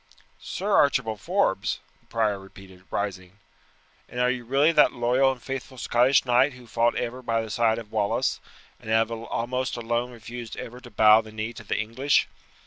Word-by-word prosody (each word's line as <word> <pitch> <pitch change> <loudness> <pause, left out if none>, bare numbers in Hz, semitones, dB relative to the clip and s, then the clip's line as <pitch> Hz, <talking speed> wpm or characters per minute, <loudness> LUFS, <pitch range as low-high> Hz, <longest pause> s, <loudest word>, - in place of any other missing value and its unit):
"Sir 205 +2 -4
Archibald 120 -7 +2
Forbes!" - - 0 0.2
the - - -34
prior 110 -3 0
repeated, 95 -1 -15
rising; 95 -2 -4 0.7
"and 125 - -6
are 125 0 +3
you 125 -2 -4
really 140 +6 +3
that 150 -2 +5
loyal 125 +2 +2
and 130 - -7
faithful 135 -1 -6
Scottish 125 +3 +3
knight 125 +3 +3
who 125 -1 -14
fought 115 +1 +1
ever 125 +1 -3
by 115 -2 0
the 110 - -7
side 110 0 +2
of 110 -2 -8
Wallace, 105 -2 0 0.4
and 110 - -10
have 110 +1 +2
almost 120 +3 -3
alone 120 +1 -1
refused 120 0 -8
ever 120 +2 -7
to 125 - -13
bow 110 0 +6
the 110 -1 -13
knee 110 +2 -4
to 110 - -10
the 100 - -2
English? 115 +6 +1
120 Hz, 180 wpm, -25 LUFS, 110-125 Hz, 0.7 s, bow